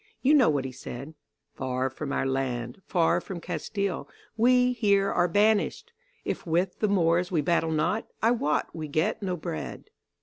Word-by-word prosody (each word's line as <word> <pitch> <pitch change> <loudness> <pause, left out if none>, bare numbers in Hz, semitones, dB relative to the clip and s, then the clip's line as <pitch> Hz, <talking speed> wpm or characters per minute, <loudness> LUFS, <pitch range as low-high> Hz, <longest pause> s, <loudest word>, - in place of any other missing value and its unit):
You 275 +3 +5
know 275 -6 +6
what 140 -3 0
he 130 - -4
said: 130 +3 -8 0.4
"'Far 130 0 -1
from 140 +2 -5
our - - 0
land, 130 0 -2
far 170 -2 +2
from 185 -3 -6
Castile 180 +4 -3 0.3
We 250 +2 +4
here 200 -4 +2
are 175 - +2
banished; 205 - +1 0.3
If - - -3
with 175 +3 0
the 215 - +2
Moors 175 -2 +2
we 165 -4 +2
battle 165 +1 +1
not, 165 +8 0
I 225 - +3
wot 150 -11 0
we 155 -2 -4
get 155 +7 0
no 185 -3 -2
bread. 80 - -6
170 Hz, 170 wpm, -27 LUFS, 145-205 Hz, 0.4 s, know